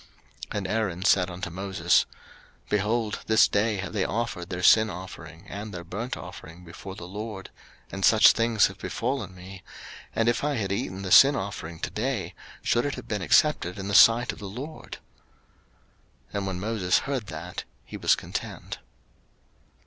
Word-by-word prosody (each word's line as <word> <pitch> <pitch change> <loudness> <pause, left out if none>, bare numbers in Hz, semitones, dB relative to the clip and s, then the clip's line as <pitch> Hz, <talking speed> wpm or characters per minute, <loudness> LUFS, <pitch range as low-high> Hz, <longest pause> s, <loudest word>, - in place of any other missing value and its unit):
03:010:019 - - -4
And 100 -2 -3
Aaron 95 -4 -1
said 95 -3 +4
unto 90 0 -5
Moses, 95 -2 +1 0.6
Behold, 105 +1 0
this 110 -1 +6
day 105 +1 +1
have 95 -2 -5
they 100 - +1
offered 110 -6 -3
their 90 0 -4
sin 110 +2 +6
offering 85 -2 -9
and 105 +2 -7
their 90 -3 -7
burnt 105 +9 -5
offering 85 +3 -11
before 95 +3 -9
the 85 -3 -9
LORD; 105 0 -7 0.4
and - - -5
such - - +7
things 115 -2 +3
have 100 0 -4
befallen 125 -4 -3
me: 90 +1 -11 0.5
and 115 - +1
if 120 - +1
I 145 -1 0
had 100 -5 -2
eaten 95 -1 -3
the 95 - -4
sin 140 +7 +8
offering 90 -6 -5
to - - -3
day, 120 -2 -2 0.3
should 120 +4 +1
it 145 - -3
have - - -9
been 105 -2 -2
accepted 90 - +2
in 100 0 -5
the - - -2
sight 115 +4 +6
of - - -13
the 100 - -7
LORD? 140 +10 -8 1.3
03:010:020 - - -26
And 100 -1 -2
when 95 -1 -3
Moses 100 -3 +1
heard 135 -6 -3
that, 85 +2 -7 0.2
he - - -9
was - - +3
content. - - -6
100 Hz, 175 wpm, -26 LUFS, 90-115 Hz, 1.3 s, sin